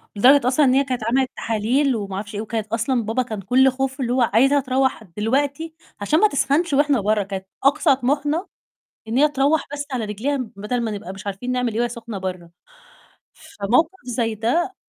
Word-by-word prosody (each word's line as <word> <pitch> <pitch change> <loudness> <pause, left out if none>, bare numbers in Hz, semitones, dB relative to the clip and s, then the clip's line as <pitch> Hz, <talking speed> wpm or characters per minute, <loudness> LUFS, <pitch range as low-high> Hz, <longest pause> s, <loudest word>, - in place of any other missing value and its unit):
لدرجة 255 +5 +5
أصلًا 275 +4 +3
إن 255 - +4
هي 275 +1 +4
كانت 255 -3 -3
عملت 255 +3 +1
تحاليل 240 +5 +1
وما 200 -3 -4
أعرفش 205 +1 -6
إيه 205 - -2
وكانت 220 -1 -4
أصلًا 230 +3 0
بابا 225 +4 0
كان 215 -4 -6
كُلّه 255 +7 +4
خوفه 270 +1 -3
اللي 245 -1 0
هو 255 - +2
عايزها 270 +6 +4
تروّح 265 -2 0
دلوقتي 275 - -2 0.3
عشان 295 +11 +2
ما 425 - +6
تسخنش 295 0 0
وإحنا 285 -3 +3
بَرّه، 210 +1 +1
كانت 190 -1 -6 0.2
أقصى 280 +1 +4
طموحنا 290 +7 -1 0.6
إن 225 +3 -1
هي 295 +3 +5
تروّح 290 +2 +1
بس 290 0 -4
على 245 -4 -2
رجليها 220 +8 -2 0.2
بدل 210 +5 -2
ما 225 -2 -2
نبقى 200 -3 -6
مش 195 0 -11
عارفين 200 +6 -4
نعمل 250 -2 -1
إيه 220 - -2
وهي 240 0 +1
سخنة 230 -3 -7
بَرّه، 185 -2 -5 1.1
فموقِف 250 +11 +3
زي 235 -2 -1
ده 250 - 0
250 Hz, 195 wpm, -21 LUFS, 215-275 Hz, 1.1 s, ما